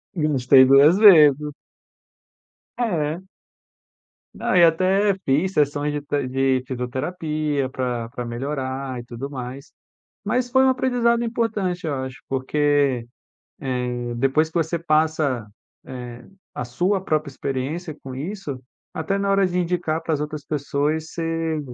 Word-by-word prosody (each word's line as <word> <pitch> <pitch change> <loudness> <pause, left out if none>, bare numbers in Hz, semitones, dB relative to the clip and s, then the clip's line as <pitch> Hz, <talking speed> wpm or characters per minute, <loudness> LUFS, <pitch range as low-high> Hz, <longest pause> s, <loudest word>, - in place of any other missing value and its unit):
Gastei 135 -4 +5
2 140 +6 +6
vezes. 150 -8 +7 1.3
É. 165 -7 -1 1.1
Não, - - -1
eu 175 -2 +7
até 190 +5 +2
fiz 155 +8 +1
sessões 145 0 +1
de 145 0 -3
te 145 -2 -2
de 130 0 +1
fisioterapia, 145 +3 -2
pra 125 -3 -3
pra 125 0 -6
melhorar 130 +1 -4
e 120 - -8
tudo 120 +3 -7
mais. 130 0 -7 0.5
Mas 245 +4 0
foi 260 +2 +4
um 265 - +5
aprendizado 245 -2 +1
importante, 215 -7 -2
eu 145 - -1
acho, 130 0 -6
porque, 135 -2 +1 0.5
eh, 125 -2 -3
depois 135 +5 +2
que 160 - -29
você 165 +1 0
passa, 155 -7 +1 0.4
eh, 125 -2 -8 0.3
a - - -4
sua 180 +10 0
própria 155 -4 -1
experiência 140 +5 -4
com 130 - -7
isso, 150 -3 -5 0.3
até 160 +5 -2
na 200 0 -1
hora 195 -1 +3
de 180 0 -3
indicar 170 -2 -1
para 165 - -1
as 150 - -1
outras 150 -1 -5
pessoas 150 +1 -1
você 165 -1 -2
150 Hz, 135 wpm, -22 LUFS, 130-175 Hz, 1.3 s, vezes